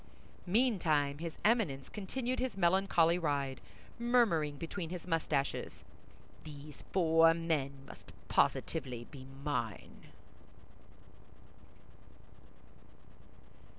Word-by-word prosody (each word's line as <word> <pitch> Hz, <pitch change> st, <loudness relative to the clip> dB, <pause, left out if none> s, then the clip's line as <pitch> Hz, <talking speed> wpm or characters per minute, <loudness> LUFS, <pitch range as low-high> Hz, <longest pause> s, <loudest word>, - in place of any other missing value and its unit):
Meantime, 170 Hz, -, +2 dB
his 165 Hz, -1 st, -5 dB
Eminence 200 Hz, -, +2 dB
continued 245 Hz, +5 st, -3 dB
his 255 Hz, -5 st, -2 dB
melancholy 175 Hz, -2 st, +3 dB
ride, 140 Hz, -5 st, -1 dB, 0.4 s
murmuring 215 Hz, -12 st, +2 dB
between 165 Hz, +2 st, -5 dB
his 180 Hz, -1 st, -6 dB
mustaches, 155 Hz, -5 st, -1 dB, 0.6 s
"These 150 Hz, -1 st, -10 dB
four 165 Hz, -2 st, +5 dB
men 160 Hz, -5 st, -1 dB
must -, -, -13 dB, 0.2 s
positively 130 Hz, -7 st, 0 dB
be 130 Hz, -2 st, -10 dB, 0.2 s
mine." 120 Hz, -8 st, -4 dB
165 Hz, 80 wpm, -33 LUFS, 145-190 Hz, 0.6 s, four